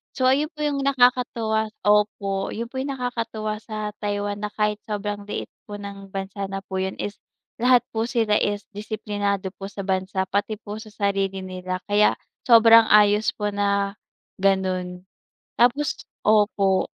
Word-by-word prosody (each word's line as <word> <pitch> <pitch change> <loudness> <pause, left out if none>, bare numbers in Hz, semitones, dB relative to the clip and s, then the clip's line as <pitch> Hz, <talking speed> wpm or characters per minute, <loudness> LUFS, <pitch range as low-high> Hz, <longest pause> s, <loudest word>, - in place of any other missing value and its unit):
So, 255 - +2
ayun 290 +3 +2
po 300 - -17
yung 290 -2 0
nakakatuwa. 245 -5 +2 0.2
Opo, 205 -2 +2
yun 230 +1 -3
po - - -15
yung 280 - -3
nakakatuwa 230 -3 -3
sa 215 -1 -4
Taiwan 205 0 -2
na - - 0
kahit 210 0 +1
sobrang 205 -1 -3
liit - - -4 0.2
po 205 - -6
ng 200 -1 -8
bansa 195 +1 -4
na 195 - -3
po 190 - -7
yun 190 - -3
is 205 - -3 0.5
lahat 250 -1 +5
po 225 +1 0
sila 225 -4 +1
is 205 0 0
disiplinado 205 -2 -2
po 195 - -7
sa 200 -1 -6
bansa, 190 0 0
pati 200 +3 -1
po 210 0 -7
sa 220 - -11
sarili 195 -2 -1
nila. 185 0 -4
Kaya 205 0 +3 0.3
sobrang 230 -1 +8
ayos 210 0 +5
po 210 -1 -1
na 200 0 +1 0.5
ganun. 185 -2 0 0.5
Tapos 260 +5 +3 0.3
opo, 205 -3 +3
205 Hz, 155 wpm, -24 LUFS, 195-220 Hz, 0.5 s, sobrang